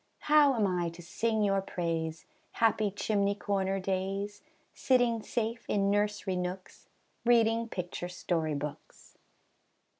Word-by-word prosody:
How 295 -3 +5
am 220 -3 +2
I 180 -3 0
to - - -9
sing 220 +5 0
your 195 -1 +2
praise, 165 -3 -3 0.3
Happy 220 -2 +2
chimney 200 0 0
corner 195 -1 -1
days, 195 +2 -2 0.3
Sitting 245 -3 +2
safe 230 +1 -2
in 200 -1 +2
nursery 205 -2 0
nooks, 180 +1 -6 0.3
Reading 230 -1 +3
picture 175 -2 -4
story 165 -4 -1
books? 145 +1 -8
200 Hz, 120 wpm, -30 LUFS, 180-225 Hz, 0.3 s, How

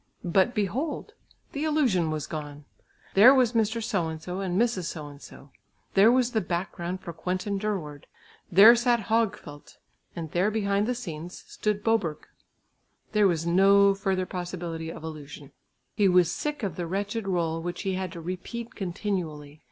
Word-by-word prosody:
But 190 +7 +2
behold! 230 - -2 0.4
the 285 - -3
illusion 260 - +2
was 155 -1 -3
gone! 150 -2 -7 0.5
There 240 +8 +8
was 250 -3 +3
Mr. 225 0 0
So 180 -7 -1
and 160 0 -6
so 180 +3 -6
and 185 -1 -1
Mrs. 230 -7 +1
So 155 -2 -5
and 145 0 -14
so, 140 - -14 0.4
there 200 +4 +6
was 250 -1 +2
the 220 - +1
background 175 +1 -4
for 170 - -7
Quentin 185 +4 -3
Durward, 175 -9 -4 0.4
there 205 +6 +9
sat 240 0 +2
Högfelt, 195 -10 -2 0.4
and 165 -3 -6
there 180 +4 +2
behind 205 -1 0
the 250 - 0
scenes, 175 -7 -7
stood 210 -1 -2
Boberg. 210 -9 0 0.9
There 210 -2 +4
was 165 -3 0
no 195 +3 +5
further 195 -1 -1
possibility 175 -3 -5
of 160 - -10
illusion. 150 -2 -9 0.4
He 205 -2 +3
was 180 -2 +4
sick 295 -4 -4
of 200 - -3
the 175 -2 -3
wretched 200 +4 -3
rôle 165 -4 -1
which 175 +1 -5
he 195 -1 -1
had 185 -1 -3
to 170 - -8
repeat 185 +7 -6
continually. 170 -6 -4
185 Hz, 165 wpm, -27 LUFS, 165-215 Hz, 0.9 s, there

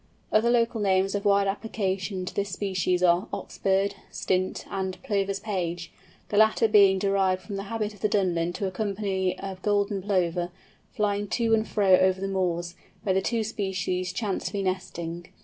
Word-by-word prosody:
Other 220 +2 +4
local 235 -2 +2
names 195 -1 +2
of 200 -1 -2
wide 200 0 +4
application 195 -2 -2
to - - -6
this 200 0 -1
species 185 -2 0
are 175 +2 +4
"Ox - - -7
bird," 195 +1 +2 0.2
"Stint," 185 0 -1
and 190 -1 -3
"Plover's 195 -1 -1
Page," 175 -5 -3 0.4
the 205 - -1
latter 220 +1 +5
being 200 -3 +6
derived 190 -1 +1
from 205 - -6
the 195 0 -4
habit 215 0 -3
of 205 - -16
the 210 - +1
Dunlin 175 -4 +1
to 200 - -3
accompany 195 -1 -1
a 195 -1 -6
Golden 205 -1 +1
Plover, 180 -3 0 0.4
flying 205 -1 -1
to 230 +2 +1
and 220 0 +2
fro 195 -3 +4
over 185 0 +3
the 195 - -2
moors, 175 -3 -1 0.3
where 190 - +1
the 190 - +2
two 230 +2 0
species 185 -4 -2
chance 205 0 -2
to - - -6
be 200 -1 -1
nesting. 175 -3 -4
195 Hz, 180 wpm, -26 LUFS, 185-205 Hz, 0.4 s, being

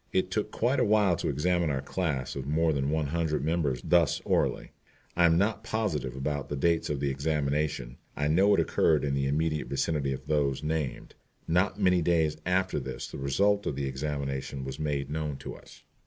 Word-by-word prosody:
It 95 0 0
took 105 +2 -1
quite 125 +4 +1
a - - +4
while 105 -4 +3
to - - -2
examine 85 +4 +1
our 65 -2 -1
class 75 -7 -2
of 70 -1 -5
more 80 +2 +2
than 70 -1 0
one 80 0 0
hundred 80 -1 -1
members 75 -7 0
thus 85 -4 +3
orally. - - 0 0.4
I 85 - +5
am 80 0 +4
not 100 +4 +1
positive 75 - -2
about 75 +1 -3
the 75 - -2
dates 85 +3 +1
of 75 -2 -1
the 70 0 0
examination. 70 -3 -1 0.2
I 75 - 0
know 95 +7 +4
it - - +1
occurred 75 -4 +2
in 70 - 0
the 70 0 0
immediate 75 +2 0
vicinity 70 0 -1
of 65 - -5
those 75 -2 0
named. 75 -4 -3 0.3
Not 90 +5 +1
many 90 -3 +3
days 80 -2 +2
after 95 -2 +1
this 65 -1 -6
the - - -7
result 100 +10 +1
of 70 - -1
the 70 0 -2
examination 70 -1 -3
was 65 +1 -6
made 70 -2 -2
known 75 -2 -3
to - - -7
us. - - -15
75 Hz, 200 wpm, -28 LUFS, 70-85 Hz, 0.4 s, I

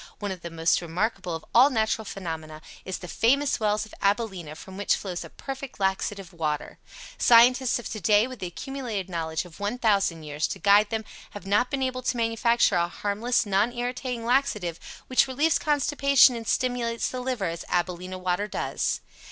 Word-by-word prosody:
One 205 -1 -4
of 185 -2 -7
the 170 - -6
most 165 +1 +1
remarkable 180 +1 -2
of 160 - -8
all 255 +4 +7
natural 220 -3 0
phenomena 160 -5 -6 0.2
is 190 - -3
the 180 - -9
FAMOUS 275 +9 +2
WELLS 215 -1 +1
OF 215 - -17
ABILENA 195 -6 -1
from 190 +4 -11
which 200 0 +1
flows 180 -3 -5
a - - -10
perfect 270 -3 -8
laxative 195 -1 -2
water. 155 -3 -3 0.4
Scientists 245 +2 +5
of 240 - -6
today, 215 0 +3
with 255 -2 -8
the 185 - -4
accumulated 225 -2 -5
knowledge 160 0 -2
of 175 0 -14
1,000 205 -6 +1
years 150 0 -2
to - - -5
guide 205 +1 +5
them, 220 -1 -3 0.3
have 205 - -8
not 210 +6 +2
been 275 -2 -1
able 255 -1 -2
to 250 0 -1
manufacture 230 -1 +2
a 170 0 +2
harmless, 210 +7 -1
non 205 +3 +2
irritating 245 -1 -3
laxative 215 -9 0 0.3
which 255 +1 +3
relieves 290 +4 +2
constipation 280 -3 +4
and 230 -1 -6
stimulates 245 -2 0
the 255 - -5
liver 250 -5 -2
as 165 0 -3
AbilenA 180 +1 -2
Water 185 +2 -1
does. - - -2
210 Hz, 175 wpm, -26 LUFS, 180-245 Hz, 0.4 s, all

